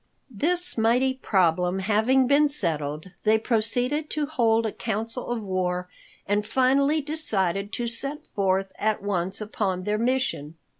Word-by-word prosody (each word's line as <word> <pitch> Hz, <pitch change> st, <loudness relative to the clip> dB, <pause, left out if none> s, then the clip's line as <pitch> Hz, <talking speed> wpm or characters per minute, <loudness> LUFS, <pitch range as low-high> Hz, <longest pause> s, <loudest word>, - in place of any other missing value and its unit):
This 345 Hz, -, 0 dB
mighty 245 Hz, +4 st, +3 dB
problem 180 Hz, -6 st, +1 dB
having 220 Hz, +7 st, +2 dB
been 285 Hz, +3 st, +4 dB
settled, 155 Hz, -, -1 dB
they 220 Hz, 0 st, +4 dB
proceeded 245 Hz, +6 st, 0 dB
to 305 Hz, -1 st, -1 dB
hold 230 Hz, -7 st, +1 dB
a 220 Hz, -, -1 dB
council 230 Hz, +2 st, -4 dB
of 240 Hz, -2 st, -2 dB
war 180 Hz, -2 st, -2 dB, 0.4 s
and 205 Hz, +1 st, 0 dB
finally 270 Hz, +6 st, +2 dB
decided 205 Hz, -, 0 dB
to 240 Hz, -, -2 dB
set 275 Hz, +5 st, -2 dB
forth 195 Hz, -1 st, 0 dB
at 215 Hz, -1 st, 0 dB
once 190 Hz, -2 st, -1 dB
upon 200 Hz, -3 st, -2 dB
their 210 Hz, +2 st, -1 dB
mission. 235 Hz, -, -1 dB
220 Hz, 140 wpm, -25 LUFS, 190-260 Hz, 0.4 s, been